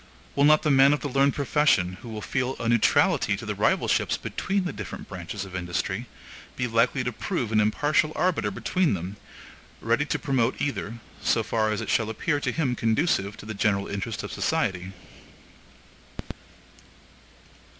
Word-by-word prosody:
Will 140 - +4
not 155 +1 +5
the 155 - +2
man 135 +1 +6
of 145 - -1
the - - -2
learned 140 +1 +2
profession, 135 - +2
who 120 - -9
will 110 -1 -6
feel 130 +1 -1
a 115 - -2
neutrality 115 -1 +3
to - - -8
the - - -2
rivalships - - +1
between 195 +1 -2
the 180 - -3
different - - -7
branches 95 +2 -6
of 95 -1 -10
industry, 95 +5 -3 0.5
be 125 - -1
likely 120 +2 +2
to 125 - -2
prove 125 - -3
an 110 - +3
impartial 145 +8 +2
arbiter 180 - +1
between 170 - 0
them, 95 +4 -6 0.6
ready - - +1
to - - -1
promote 130 -2 0
either, 125 -6 -2 0.3
so 115 - +2
far 110 0 0
as 105 - -2
it - - -5
shall 110 -1 +1
appear 145 +7 -1
to - - -1
him 135 -6 0
conducive 110 - 0
to - - -11
the 110 - -5
general 100 -1 +1
interests 100 +2 -4
of - - -6
the - - -7
society? 95 0 0
115 Hz, 170 wpm, -26 LUFS, 105-140 Hz, 0.6 s, man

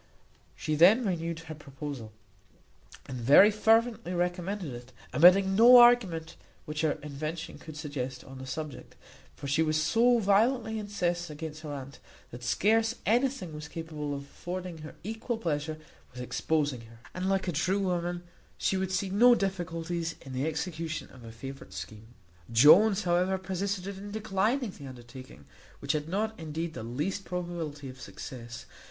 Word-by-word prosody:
She 155 - -3
then 190 +11 +6
renewed 170 -3 -2
her 160 -1 -8
proposal, 140 -5 -8 0.9
and 130 -2 -6
very 145 - +7
fervently 220 -3 +2
recommended 175 -2 -2
it, 120 +1 -10 0.2
omitting 190 +4 +6
no 240 +4 +9
argument 200 -10 +5 0.3
which 150 0 -3
her 155 -2 +2
invention 155 +3 -5
could 155 -2 -10
suggest 130 -4 -5
on 135 0 -11
the 130 - -8
subject; 155 0 -6 0.4
for 145 - -9
she 140 +4 +2
was 155 -1 +2
so 235 +10 +4
violently 220 +2 +2
incensed 175 -5 -2
against 155 0 -7
her 155 -2 -6
aunt, 135 -1 -8 0.3
that 120 +1 -9
scarce 220 - +2
anything 240 - +1
was 150 +1 -7
capable 155 -3 -5
of 140 - -5
affording 175 +3 -7
her 155 0 -10
equal 225 +3 -3
pleasure 155 -5 -2 0.3
with 125 - -11
exposing 145 -1 -1
her; 115 0 -15 0.2
and, 185 +1 -2
like 195 -1 0
a - - +1
true 185 +5 +1
woman, 175 -2 -1 0.3
she 190 - 0
would 190 0 -2
see 190 0 -1
no 240 +5 +6
difficulties 170 -4 -3
in 135 - -9
the 130 +4 -1
execution 160 0 -4
of 125 -3 -14
a 115 - -9
favourite 135 +4 -9
scheme. 110 +3 -9 0.4
Jones, 185 - +7
however, 180 +2 +2
persisted 190 0 -3
in 205 +1 -8
declining 220 +3 0
the 140 -6 -11
undertaking, 125 - -12 0.3
which - - -1
had 150 +1 -2
not, 215 +4 -1
indeed, 160 +1 -4
the - - -6
least 150 - -3
probability 170 -6 -5
of 130 0 -10
success. 120 -2 -8
165 Hz, 160 wpm, -29 LUFS, 145-195 Hz, 0.9 s, no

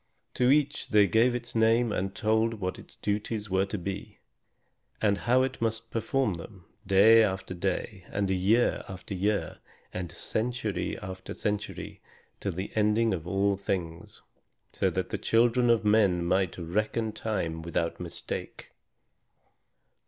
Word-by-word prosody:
To 125 0 +2
each 145 +1 +2
they 105 -1 +5
gave 115 +4 +3
its 120 0 -5
name 115 +1 +3
and 95 -1 -2
told 110 +1 +1
what 95 -3 -4
its - - -15
duties 105 0 -3
were 95 +1 +2
to 105 - -3
be, 95 +2 -6 0.8
and 105 -2 +3
how 125 +5 +2
it 130 -2 -3
must 115 0 -2
perform 115 0 0
them, 90 +2 -10 0.2
day 105 +4 +7
after 95 -3 -1
day, 95 +1 -3
and 100 0 -1
year 95 +6 +2
after 95 +1 -7
year, 100 +2 -1 0.3
and 90 -2 -4
century 110 +2 -2
after 95 0 -7
century, 105 0 -4 0.4
till 100 - -3
the 95 +4 -5
ending 110 +1 +2
of 85 -2 -4
all 100 +2 +2
things; 85 -4 -4 0.5
so - - +1
that - - -2
the - - -3
children 120 +1 +3
of 115 -2 +3
men 100 -5 +3
might 95 +1 +1
reckon 105 +6 -1
time 90 -8 -3
without 85 0 -2
mistake. 85 -2 -6
105 Hz, 145 wpm, -28 LUFS, 95-115 Hz, 0.8 s, day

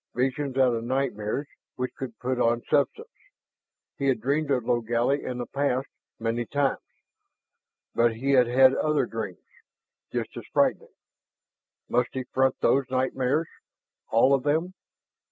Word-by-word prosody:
Visions 130 +2 -1
out 130 -2 +4
of 115 0 -2
nightmares 130 0 -2 0.3
which 125 0 -3
could 125 -4 -7
put 125 0 -2
on 120 0 +2
substance! 435 - +1 0.9
He 140 - 0
had 130 -4 +2
dreamed 145 +5 0
of 125 -4 +1
Logally 120 +4 +1
in 125 - -4
the 120 - -3
past, 135 -1 -1 0.3
many 115 +1 -1
times. 140 -1 0 1.1
And 115 -1 +2
he 135 +5 -1
had 125 -3 +5
had 130 +2 +6
other 150 -3 +1
dreams, 110 -6 -6 0.7
just - - -3
as - - -7
frightening. - - +1 0.9
Must 120 0 +1
he 130 - -3
front 130 +1 +1
those 135 -1 +2
nightmares, 130 +4 0 0.6
all 125 +4 +4
of 135 - +3
them 160 +6 0
130 Hz, 140 wpm, -26 LUFS, 120-140 Hz, 1.1 s, had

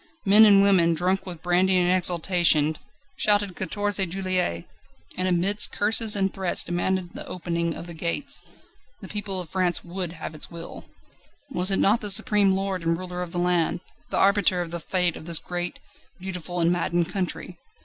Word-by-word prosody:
Men 210 +3 +7
and 200 -2 +6
women, 175 -4 +3
drunk 185 +3 -1
with 170 -3 -8
brandy 180 +1 +2
and 180 -1 +2
exultation, 175 -4 +2 0.4
shouted 205 -3 +1
"Quatorze 205 +1 0
Juillet!" 185 - -2 0.5
and 185 - -1
amidst 185 +4 +2
curses 215 +1 +3
and 195 -1 0
threats 190 -2 +2
demanded 175 +1 -2
the - - -8
opening 170 -2 -3
of - - -8
the 170 - -8
gates. 175 - 0 0.6
The - - -9
people 200 -2 -3
of 175 -4 -8
France 185 -2 0
would 175 -1 -5
have 160 -2 -8
its 155 - -4
will. 170 -1 -9 0.7
Was 185 -6 +2
it 195 - +3
not 215 +4 +2
the 210 - -4
supreme 205 -1 +3
lord 190 -1 -2
and 165 0 0
ruler 180 0 -6
of 175 -1 -6
the 175 - -4
land, 175 -1 0 0.3
the - - -2
arbiter 200 -2 +3
of 175 -2 -4
the 170 - -4
Fate 180 0 -1
of 155 - -11
this 170 -1 +3
great, 175 +1 -4 0.4
beautiful, 180 -1 -6
and 170 0 +2
maddened 175 0 -1
country? 180 -1 -5
180 Hz, 180 wpm, -24 LUFS, 170-195 Hz, 0.7 s, Men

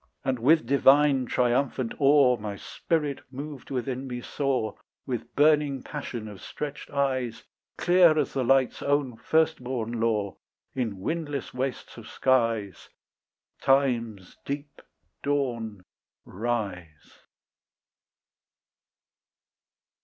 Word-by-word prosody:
And 130 -2 0
with 155 +6 +4
divine 140 0 +4
triumphant 125 0 +1
awe 140 -3 +5
My 105 -3 -5
spirit 150 +5 -2
moved 140 +1 -8
within 130 0 -3
me 125 -1 -4
saw, 130 -6 -1 0.3
With 125 -4 -5
burning 145 -3 +3
passion 125 -7 -6
of 105 -3 -10
stretched 150 -1 -6
eyes, 130 -4 -1 0.3
Clear 175 -3 +5
as - - 0
the 135 - 0
light's 130 +1 +2
own 140 -4 0
firstborn 125 -4 0
law, 105 -3 0 0.4
In 110 -7 -3
windless 150 - -3
wastes 130 0 -4
of - - -10
skies 115 -6 0 0.7
Time's 115 -8 +1
deep 145 +1 -6 0.4
dawn 120 -8 -2 0.4
rise. 95 -8 -4
130 Hz, 100 wpm, -27 LUFS, 115-140 Hz, 0.7 s, awe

